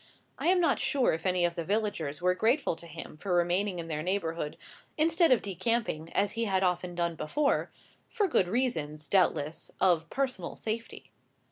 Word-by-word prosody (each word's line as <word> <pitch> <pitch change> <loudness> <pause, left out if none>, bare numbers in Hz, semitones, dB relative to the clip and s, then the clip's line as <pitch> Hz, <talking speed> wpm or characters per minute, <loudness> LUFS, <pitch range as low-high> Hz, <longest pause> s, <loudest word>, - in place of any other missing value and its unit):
I - - -1
am 365 +1 +5
not 330 -5 +2
sure 270 -3 +2
if 165 +4 -2
any 180 -1 +2
of 170 - 0
the 170 - -3
villagers 190 -6 -2
were 180 0 +4
grateful 230 - +1
to 170 - -12
him 155 -1 -9
for 180 +2 -1
remaining 180 +2 +1
in 165 -1 -5
their 155 -2 -3
neighbourhood, 165 -4 -2 0.4
instead 330 0 +3
of 250 - +4
decamping 195 -4 -1
as 200 0 +2
he 230 +2 -1
had 190 -2 +1
often 180 -1 0
done 170 -1 0
before, 280 - 0 0.4
for 420 -4 +1
good 195 - +2
reasons, 160 - -1
doubtless, 165 -5 +1
of 170 -4 +3
personal 255 -10 -2
safety. 225 +1 -5
185 Hz, 175 wpm, -30 LUFS, 165-230 Hz, 0.4 s, am